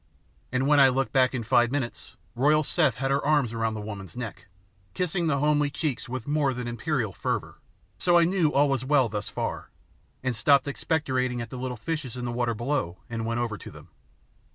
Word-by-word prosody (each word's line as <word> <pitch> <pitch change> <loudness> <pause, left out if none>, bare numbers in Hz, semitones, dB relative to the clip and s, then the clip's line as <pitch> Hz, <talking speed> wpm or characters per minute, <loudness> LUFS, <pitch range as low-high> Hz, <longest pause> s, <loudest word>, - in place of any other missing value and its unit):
And 130 +1 +1
when 145 0 +5
I 135 -1 +8
looked 135 +1 -1
back 130 -1 +3
in 120 - -2
five 120 +2 +3
minutes, 130 -3 -4 0.2
royal 150 +5 +3
Seth 150 -3 +2
had 135 +1 -1
her 140 +1 +1
arms 145 -6 +2
round 115 -1 -1
the 105 - -5
woman's 100 0 -8
neck, 120 -4 -6 0.5
kissing 180 -1 0
the 145 -3 +2
homely 150 0 +2
cheeks 140 -5 -3
with 125 -2 -4
more 145 -3 +1
than 125 -1 -4
imperial 120 - -2
fervour, - - -3 0.4
so 175 -1 +4
I 170 - +6
knew 170 -3 +2
all 145 +1 +4
was 135 -3 0
well 135 -3 +3
thus 105 -1 -4
far, - - -4 0.5
and 125 -2 -1
stopped 140 +5 +4
expectorating 130 -4 -1
at 115 -1 -6
the 130 - -6
little 125 -1 -4
fishes 145 -2 -4
in 125 - -4
the 120 - -2
water 120 -1 -1
below 120 -7 -2
and 115 -1 -3
went 115 +1 -1
over 115 -3 -3
to - - -9
them. 75 +2 -14
130 Hz, 205 wpm, -26 LUFS, 120-145 Hz, 0.5 s, I